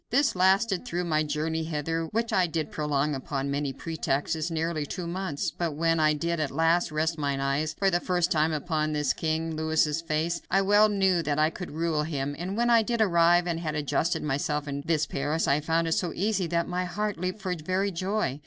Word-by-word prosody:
This 275 +1 +2
lasted 190 +2 +3
through 180 -7 -2
my 155 -3 +1
journey 155 +2 -1
hither, 165 +1 -2
which 230 +7 -2
I 180 -1 +3
did 160 -2 -3
prolong 150 -1 0
upon 135 +1 -3
many 140 0 -1
pretexts, 155 +2 -2
nearly 165 -1 -1
two 175 +5 -5
months, 175 -2 -3
but 165 -4 -3
when 165 +1 +1
I 155 -1 +4
did 170 +2 -2
at 150 -3 0
last 165 +3 +2
rest 160 +1 -1
mine 140 -2 -1
eyes 140 +3 -1
for 195 -1 +2
the 175 - +2
first 180 -1 0
time 155 0 +2
upon 155 -1 -1
this 150 -3 +1
King 160 0 -2
Louis's 160 0 +1
face, 165 +1 -1
I 195 +1 +3
well 205 +2 +5
knew 190 -4 +2
that 145 -3 -1
I 155 +1 +3
could 180 +1 -7
rule 160 0 -1
him, 145 -2 -3
and 185 +4 -4
when 240 +1 +2
I 230 -1 +6
did 235 +1 -2
arrive, 175 -3 +4
and 170 -2 -2
had 155 -3 -3
adjusted 150 +3 0
myself 150 +1 -1
in 140 0 -3
this 155 -2 +2
Paris, 145 +4 -1
I 140 +2 +3
found 165 +2 0
it - - -1
so 170 +1 0
easy 195 -2 0
that 170 0 0
my 180 0 -2
heart 210 +1 -3
leaped 185 +3 -3
for 185 -2 -1
very 185 +4 -1
joy. 185 -5 -2
165 Hz, 215 wpm, -27 LUFS, 150-180 Hz, -, I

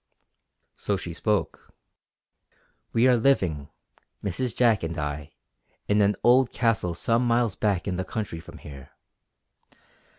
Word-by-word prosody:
So 100 - -1
she 90 -2 -6
spoke: 105 +4 -2 1.2
"We 115 +3 +3
are 125 - +5
living, 95 - +1 0.5
Mrs. 105 +5 -2
Jack 115 -4 +3
and 85 +1 -4
I, 75 -1 -4 0.5
in 105 0 +3
an 100 0 +3
old 125 +1 +5
Castle 110 -8 0
some 115 +7 +1
miles 120 -3 +2
back 100 -4 0
in 90 -2 -2
the 95 - -1
country 95 -3 -5
from 80 - -12
here. 70 -2 -12
105 Hz, 130 wpm, -26 LUFS, 85-115 Hz, 1.2 s, are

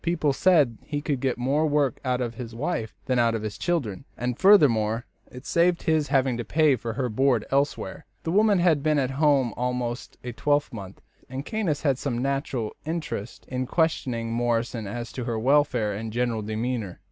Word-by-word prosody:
People 165 -4 +1
said 145 -8 +3
he 145 - -3
could 145 -2 -2
get 130 -1 -1
more 140 +6 +1
work 145 -4 +1
out 125 -1 0
of 120 -2 -2
his 115 -1 -8
wife 130 -4 -3
than 125 -1 +1
out 115 -1 +3
of 110 - -3
the 110 - -2
children, 135 - -2
and, 125 0 -3
furthermore, 120 - +5 0.3
it 125 +1 -11
saved 170 +1 +2
his 155 -2 +2
having 135 -3 +2
to 120 - -3
pay 150 +4 +3
for 115 -1 -5
her 125 +2 -1
board 125 0 +2
elsewhere. 145 +5 -1 0.2
The 165 - -2
woman 205 +1 +4
had 170 -5 +3
been 155 0 +2
at 135 -2 +1
home 135 -4 +2
almost 125 0 -3
a 125 - -4
twelvemonth, 120 -7 -2 0.3
and 130 +2 -5
Caius 200 -10 -1
had 135 -4 +2
some 120 - -2
natural 135 -3 -2
interest 155 -9 -5
in 130 0 -3
questioning 125 -9 0
Morrison 115 -1 -1
as 120 +3 -5
to 125 - -5
her 115 -2 -2
welfare 125 -4 +2
and 110 +2 -5
general 120 -1 -1
demeanour. 110 -2 -3
130 Hz, 185 wpm, -25 LUFS, 115-150 Hz, 0.3 s, furthermore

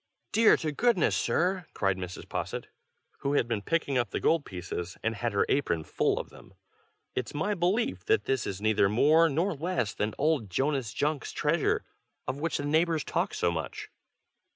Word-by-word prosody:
"Dear 225 0 +6
to 155 -2 -2
goodness, 230 +3 +2
sir!" 180 0 0
cried 95 -2 +1
Mrs. 90 -1 -7
Posset, - - -4 0.5
who 140 - -1
had 130 - +2
been 115 -3 -1
picking 140 0 0
up 120 -4 0
the - - -2
gold 165 -3 +2
pieces, 90 -1 -6
and 115 - +1
had 115 +2 -2
her 100 - +3
apron 110 - +1
full - - 0
of - - -7
them. - - -16 0.6
"It's 125 +3 -4
my 200 +8 0
belief 175 - 0
that - - +3
this 135 -3 0
is 95 -1 -4
neither 105 -2 +3
more 155 +9 +5
nor 170 +7 0
less 160 - -1
than 105 +1 -2
old 145 -8 +1
Jonas 135 +2 0
Junk's 145 +1 -1
treasure, - - +1 0.4
of 130 +2 -3
which 165 +2 -1
the 145 - -3
neighbors 160 0 +2
talk - - -1
so 85 - +1
much." 80 -2 -5
140 Hz, 180 wpm, -29 LUFS, 105-165 Hz, 0.6 s, Dear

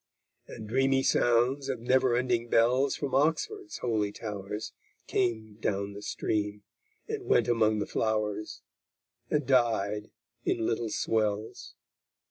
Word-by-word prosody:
And 110 - -8
dreamy 135 +3 +2
sounds 125 +4 +2
of 130 -3 -2
never 125 +1 +3
ending 120 -1 0
bells 125 +5 +3
From 140 -3 -4
Oxford's 165 - 0
holy 110 -4 0
towers 105 0 -6 0.3
Came 110 -4 -1
down 100 -2 -1
the 100 - -8
stream, 105 0 -2 0.4
and 435 -3 -4
went - - +4
among 110 -2 +3
the 105 - -1
flowers, 110 0 -2 0.7
And 150 -2 +1
died 110 -5 +1 0.3
in 115 - 0
little 115 0 -1
swells_. 110 +2 -1
115 Hz, 120 wpm, -29 LUFS, 105-130 Hz, 0.7 s, went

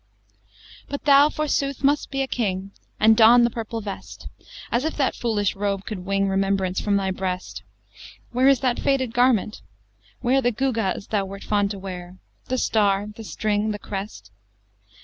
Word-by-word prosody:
XVIII 100 -1 -25
But 285 - -5
thou 285 +1 +6
forsooth 280 -3 -2
must 285 +2 +2
be 270 0 -1
a - - -4
king, 195 -6 -2 0.3
And 220 +1 +6
don 235 +2 +7
the 235 - +2
purple 225 0 -5
vest, 200 -1 -8 0.4
As 240 +2 +1
if 315 - -3
that 275 -3 +1
foolish 210 -4 -1
robe 200 -1 -2
could 190 -4 -6
wring 195 0 +1
Remembrance 195 -1 0
from 205 -1 +1
thy 195 -1 0
breast. 185 -1 -4 0.7
Where 255 +2 +3
is 275 -2 +4
that 255 -3 0
faded 260 -4 0
garment? 240 -4 +2 0.6
where 265 +2 +2
The 245 - +2
gewgaws 225 -6 -1
thou 205 -3 0
wert 195 +1 -9
fond 205 -1 +1
to 200 - -5
wear, 180 -1 -8 0.3
The 255 - -1
star, 205 -3 +1
the 225 - -9
string, 215 0 -1
the 210 - -2
crest? 195 - -7
210 Hz, 170 wpm, -23 LUFS, 195-245 Hz, 0.7 s, don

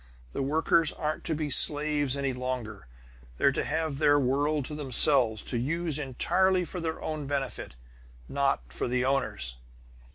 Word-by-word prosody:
The - - -3
workers 160 +3 +1
aren't 155 0 -4
to 160 - -1
be 150 -1 -3
slaves 145 0 +4
any 140 -1 -2
longer; 125 - -5 0.5
they're 140 - +3
to - - -2
have 155 -2 -2
their 145 0 +4
world 145 +2 0
to 150 - -7
themselves, 130 -5 +3
to 120 - -3
use 160 +3 -2
entirely 180 +7 +1
for 180 - -7
their 160 -1 -4
own 155 -3 -4
benefit; 140 - -4 0.5
not 135 - -1
for - - -3
the 125 +1 0
owners! 105 - -2
140 Hz, 155 wpm, -27 LUFS, 125-155 Hz, 0.5 s, slaves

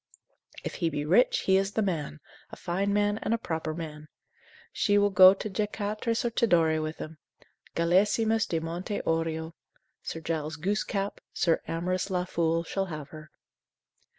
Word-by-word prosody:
If - - -5
he 165 - +2
be 145 -1 -3
rich, 190 +11 +4
he 190 0 +3
is 195 +1 0
the 220 - +1
man, 155 - -3 0.3
a - - -9
fine 195 +4 -1
man, 205 +1 +1
and 230 - +1
a - - -1
proper 160 -6 -3
man, 155 -2 -7 0.7
she 205 -2 +2
will 205 0 +3
go 185 0 +9
to 205 - -5
Jacaktres 215 +3 -2
or 235 - 0
Tidore 165 -9 +3
with 155 +1 -4
him; 155 0 -8 0.6
Galesimus 210 +6 +2
de 165 - 0
monte 175 +5 -4
aureo. 160 0 -1 0.5
Sir 165 - -5
Giles 160 -1 -3
Goosecap, 200 +3 -2
Sir 165 -2 +2
Amorous 180 +3 -2
La 180 -1 0
Fool, 165 -1 0
shall 195 +3 -2
have 150 -4 -7
her. 155 -1 -11
175 Hz, 160 wpm, -28 LUFS, 160-205 Hz, 0.7 s, go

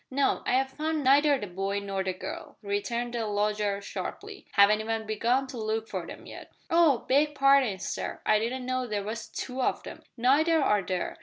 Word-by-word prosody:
"No, 275 +1 +1
I - - +2
have 265 +1 +2
found 310 +1 -2
neither 285 +2 +5
the 210 - -5
boy 195 +2 -3
nor 195 -1 -2
the 190 -1 -2
girl," 185 - -8
returned 235 +4 -2
the 230 -2 -2
lodger 210 -1 0
sharply. - - -7
"Haven't 210 +1 +5
even 225 0 -2
begun 235 +5 +1
to 255 -3 -7
look 220 0 -2
for - - -5
them - - -10
yet." - - -11 0.2
"Oh! 325 -7 +4
beg 295 +2 +3
parding, 275 -7 +4
sir, 190 - -4
I 215 - +4
didn't 250 +3 -3
know 255 0 -1
there 210 -2 -2
was 215 +2 -5
two 260 0 -5
of - - -1
'em." - - -9 0.2
"Neither 300 +7 +3
are 210 -8 +3
there. 185 -1 -3
230 Hz, 200 wpm, -28 LUFS, 205-270 Hz, 0.2 s, neither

